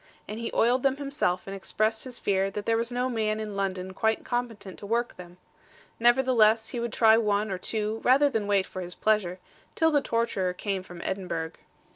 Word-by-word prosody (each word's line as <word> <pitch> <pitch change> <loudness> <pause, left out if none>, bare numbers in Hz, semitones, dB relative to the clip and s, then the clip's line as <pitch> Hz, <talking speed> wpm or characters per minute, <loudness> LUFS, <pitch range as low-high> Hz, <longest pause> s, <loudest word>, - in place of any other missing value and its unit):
And 215 +2 -6
he 235 - -3
oiled 245 +3 +3
them 275 0 +1
himself, 275 -11 -1
and 195 - -6
expressed 215 +4 -1
his 250 -2 -7
fear 195 -1 +1
that 205 +1 -5
there 230 - +2
was 230 +1 -1
no 250 +1 0
man 220 -3 -1
in 210 -2 -5
London 190 -1 -3
quite 220 +3 0
competent 230 -6 -4
to 200 - -8
work 235 +2 -1
them. 175 0 -12 0.6
Nevertheless 235 -2 +4
he 240 - -4
would 235 -1 -2
try 220 -1 +5
one 210 -1 0
or 185 - -3
two, 215 +2 -2
rather 275 +3 +5
than 225 -7 -1
wait 200 -2 +2
for 185 - -7
his 180 0 -7
pleasure, 210 -5 +1 0.4
till 320 0 +3
the 290 -2 +3
torturer 230 -8 0
came 195 +1 -3
from 180 -2 -10
Edinburgh. 170 -4 -3
215 Hz, 200 wpm, -27 LUFS, 195-235 Hz, 0.6 s, try